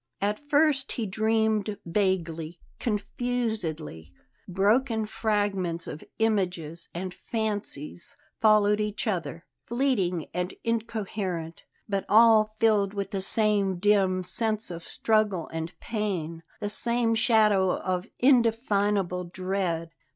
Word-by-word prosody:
At 205 +1 -1
first 290 -2 +3
he 230 - -2
dreamed 215 0 0
vaguely, 170 -3 -1 0.2
confusedly; 210 - -3 0.4
broken 220 +5 +2
fragments 205 -6 -1
of 155 - -7
images 180 -7 -1
and 180 +1 -5
fancies 205 -9 -4 0.2
followed 210 -1 +4
each 210 +1 -2
other, 170 -6 -3 0.2
fleeting 225 - 0
and 180 +1 -3
incoherent, 205 -7 -3 0.2
but 195 -2 -2
all 215 -1 +6
filled 210 -3 +3
with 200 0 -3
the 195 -2 -2
same 205 -2 +1
dim 190 -1 +2
sense 215 +1 +1
of 170 -1 -8
struggle 210 -6 +1
and 160 +1 -4
pain, 185 -8 -3 0.2
the 205 - -3
same 235 +2 +1
shadow 215 -5 +3
of 185 -1 -2
indefinable 210 -7 +2
dread. 180 -2 -2
205 Hz, 105 wpm, -27 LUFS, 180-220 Hz, 0.4 s, all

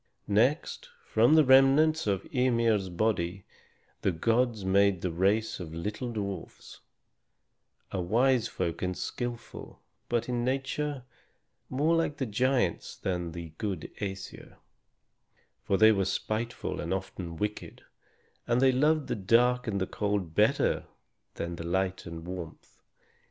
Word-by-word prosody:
Next, 130 - +1 0.2
from 155 - +4
the 155 -2 +6
remnants 135 +3 +5
of 100 -2 0
Ymir's 115 -6 +2
body 90 -1 -1 0.6
the 95 - +2
gods 115 +4 +1
made 100 -1 +3
the 90 - -1
race 105 +5 +1
of 80 -3 -7
little 105 +8 -4
dwarfs, 100 -3 -6 1.1
a 95 - -2
wise 120 +6 +2
folk 85 - -3
and 90 0 -2
skillful, 120 -1 -6 0.3
but 120 -1 0
in 120 -1 -1
nature 135 +2 -2 0.7
more 150 +6 +2
like 165 -3 0
the 135 - -1
giants 120 -3 0
than 90 -2 -2
like 85 - -7
the 85 -1 -7
good 95 -7 -4
Æsir; 95 -2 -6 1.1
for 95 - 0
they 110 +1 +7
were 100 -3 +1
spiteful 110 +4 -3
and 85 +4 -1
often 95 -3 -6
wicked, 105 +2 -4 0.6
and 120 +1 +2
they 135 0 +5
loved 150 +3 +2
the - - -2
dark 120 +5 +3
and 100 -2 -1
the 95 - 0
cold 100 -5 -2
better - - +2 0.5
than 85 0 -4
light 95 +3 -2
and 85 0 -7
warmth. 90 -3 -9
105 Hz, 135 wpm, -29 LUFS, 95-125 Hz, 1.1 s, they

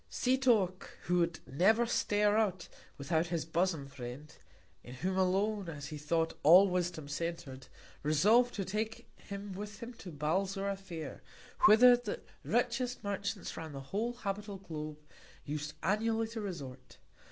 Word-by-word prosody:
_ - - -36
Setoc, 240 -8 +2 0.2
who 180 0 +2
would 170 -1 0
never 215 - +3
stir 210 -3 +2
out 195 -5 +1 0.3
without 160 +4 0
his 165 -2 -2
Bosom 165 -2 0
Friend 135 +2 -9 0.5
(in 125 - -9
whom 185 +8 -2
alone, 190 +1 +1
as 145 -3 -7
he 155 - -6
thought, 165 +2 0
all 180 +6 +8
Wisdom 175 -4 -2
center'd) 145 -4 -5 0.3
resolv'd 210 +12 +4
to 195 - -2
take 215 +3 -3
him 200 0 -7
with 205 +2 -7
him 235 +2 -8
to 190 -6 -10
Balzora 195 +6 -1
Fair, 170 -6 -8 0.5
whither 245 +3 +8
the 245 - -4 0.2
richest 245 +1 0
Merchants 200 -1 -3
round 160 -3 -7
the - - -5
whole 230 +4 0
habitable 205 -3 -4
Globe, 155 -5 -6 0.5
us'd 150 +1 -3
annually 225 +4 +1
to 225 -1 -5
resort. 140 -10 -7
190 Hz, 145 wpm, -33 LUFS, 155-215 Hz, 0.5 s, all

